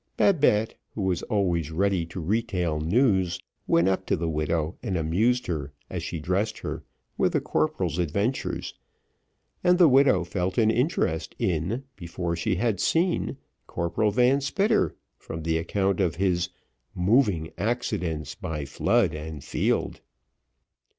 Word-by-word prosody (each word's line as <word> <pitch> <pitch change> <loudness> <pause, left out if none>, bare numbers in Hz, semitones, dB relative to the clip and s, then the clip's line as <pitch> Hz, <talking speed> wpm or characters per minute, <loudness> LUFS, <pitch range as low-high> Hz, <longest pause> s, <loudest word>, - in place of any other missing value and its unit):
Babette, 135 - +3 0.2
who 105 - -2
was 90 -2 0
always 90 -7 0
ready 90 0 0
to 90 - -7
retail 90 -4 -1
news, 95 - +2 0.3
went 85 +2 +4
up 95 0 0
to - - +2
the 85 -1 -2
widow, 80 +1 -1
and 95 - -2
amused 105 +11 +1
her, 75 -5 -4 0.2
as 90 - -3
she 85 0 -4
dressed 95 +7 -1
her, - - -5 0.4
with - - +2
the - - +3
corporal's 80 +2 -1
adventures, 100 - -1 0.9
and 180 0 +5
the 175 -2 +7
widow 130 -9 +5
felt 90 +1 -2
an 110 -1 +4
interest 120 - 0
in, 95 - -1
before 85 0 -3
she 95 +4 0
had 110 0 0
seen, 175 +2 +1 0.3
Corporal 85 +6 0
Van 125 +6 +3
Spitter, 200 +10 +1 0.2
from 80 0 -7
the 80 0 +1
account 95 +3 0
of 85 -4 +1
his 90 -1 +1 0.5
"moving 95 - +2
accidents 100 -8 -2
by 75 -3 -5
flood 70 - +2
and 75 -1 -6
field." - - -1
90 Hz, 140 wpm, -26 LUFS, 80-110 Hz, 0.9 s, the